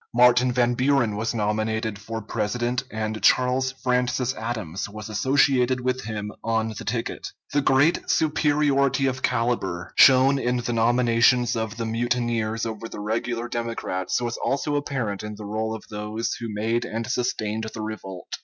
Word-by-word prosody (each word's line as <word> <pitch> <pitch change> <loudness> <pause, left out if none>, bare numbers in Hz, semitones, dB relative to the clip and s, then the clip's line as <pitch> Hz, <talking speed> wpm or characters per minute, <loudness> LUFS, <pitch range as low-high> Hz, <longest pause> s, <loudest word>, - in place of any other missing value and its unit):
Martin 125 +1 +5
Van 120 0 +2
Buren 125 -4 +2
was 115 +3 -2
nominated 110 0 -1
for 110 +1 -6
President, 120 +4 -1
and 110 0 -3
Charles 130 +1 +3
Francis 125 0 +1
Adams 110 -6 -4
was 110 +1 -8
associated 130 +2 +2
with 130 0 -1
him 105 -2 -4
on 110 0 0
the 110 - -7
ticket. 115 +1 -3 0.3
The 145 - +3
great 140 +5 +3
superiority 145 -3 +2
of 130 -1 -1
caliber 115 -8 -1
shown 135 +1 +7
in 125 -1 0
the 120 0 -2
nominations 120 +1 +3
of 110 -1 -3
the 115 - -2
mutineers 115 -1 -1
over 115 0 -5
the - - -8
regular 115 +3 -2
Democrats 115 -6 -2
was 120 -1 -3
also 145 +2 -1
apparent 125 -8 -2
in 105 0 -6
the 105 0 -9
roll 110 +2 -2
of 110 - -9
those 105 +2 -3
who 115 -2 -5
made 110 +3 0
and 115 +1 -4
sustained 110 -3 -2
the 110 - -6
revolt. 95 -4 -7
115 Hz, 155 wpm, -24 LUFS, 110-125 Hz, 0.3 s, shown